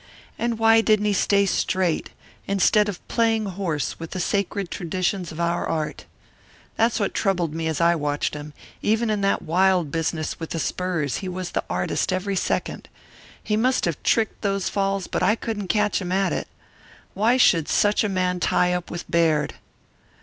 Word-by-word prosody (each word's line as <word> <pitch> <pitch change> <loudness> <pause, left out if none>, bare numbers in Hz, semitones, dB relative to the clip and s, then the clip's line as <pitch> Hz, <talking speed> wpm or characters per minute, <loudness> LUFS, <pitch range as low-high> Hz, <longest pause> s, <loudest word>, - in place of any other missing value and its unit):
And 235 -1 -1
why 225 0 +5
didn't 215 -2 +2
he 210 - +2
stay 200 +1 +3
'straight' 185 -3 0 0.4
instead 200 +2 +3
of 190 - -8
playing 225 -2 +1
horse 180 -6 -3
with 165 0 -6
the - - -2
sacred 200 0 -1
traditions 180 +1 -2
of 160 - -9
our 170 0 0
art? 155 -2 -3 0.7
That's 230 +1 +2
what 200 - -1
troubled 180 -6 0
me 160 0 -2
as 160 -2 -1
I 170 0 +4
watched 145 -3 -1
him. 150 0 -7 0.3
Even 220 +1 +1
in 210 -1 0
that 195 0 +1
wild 180 -2 +2
business 160 0 -2
with 165 - -5
the 165 - -3
spurs 170 -6 -1
he 190 - -5
was 180 -1 -5
the - - -1
artist - - -1
every 190 +2 -1
second. - - -2 0.5
He 210 - 0
must 255 +4 +2
have 170 -4 -2
tricked 225 -1 +1
those 195 -2 0
falls 195 -1 -1
but - - -3
I 195 +4 +3
couldn't 215 -4 -4
catch 210 +2 +1
him 180 -1 -4
at 195 +1 +1
it. - - -3 0.7
Why 225 +6 +3
should 165 - +4
such 205 +1 +2
a 210 - 0
man 180 -1 0
tie 180 0 +2
up 180 -1 -3
with 175 - -6
Baird?" 160 -3 +2
185 Hz, 180 wpm, -23 LUFS, 170-210 Hz, 0.7 s, why